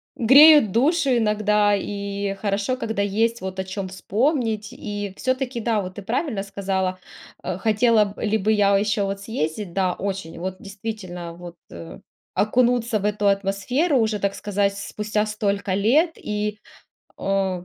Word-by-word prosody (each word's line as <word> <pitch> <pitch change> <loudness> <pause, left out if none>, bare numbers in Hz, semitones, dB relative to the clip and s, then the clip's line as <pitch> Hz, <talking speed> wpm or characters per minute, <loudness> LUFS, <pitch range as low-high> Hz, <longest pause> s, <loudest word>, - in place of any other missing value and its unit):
греют 280 0 +7
душу 280 - +2
иногда 210 -1 +2
и 200 0 -3
хорошо, 200 +5 -1
когда 220 -4 -2
есть 225 +4 0
вот 190 0 -5
о - - 0
чём 190 0 -5
вспомнить 220 - -1
и 205 -2 -6
всё-таки, 255 -1 -1
да, 220 -2 0
вот 185 -1 -7
ты 205 - -8
правильно 225 - -2
сказала, 190 -2 -2 0.4
э, 185 - -3
хотела 220 +1 +3
б 200 +2 -8
ли 220 0 +1
бы 215 +2 +1
я 200 -1 +4
ещё 205 0 0
вот 195 0 -4
съездить, 185 -2 -3
да, 185 -2 +1
очень 190 -5 -5
вот 185 +1 -4
действительно, 195 -4 -7
вот, 175 0 -10 0.2
э, 80 -8 -10 0.4
окунуться 240 0 +2
в 200 - -4
эту 210 0 0
атмосферу, 200 - +1
уже, 220 -3 +1
так 200 0 -1
сказать, 200 -1 -1
спустя 210 +1 -2
столько 205 -2 -1
лет 260 - +3
и, 210 0 -3 0.6
о, 190 -2 -1
205 Hz, 155 wpm, -23 LUFS, 195-225 Hz, 0.6 s, греют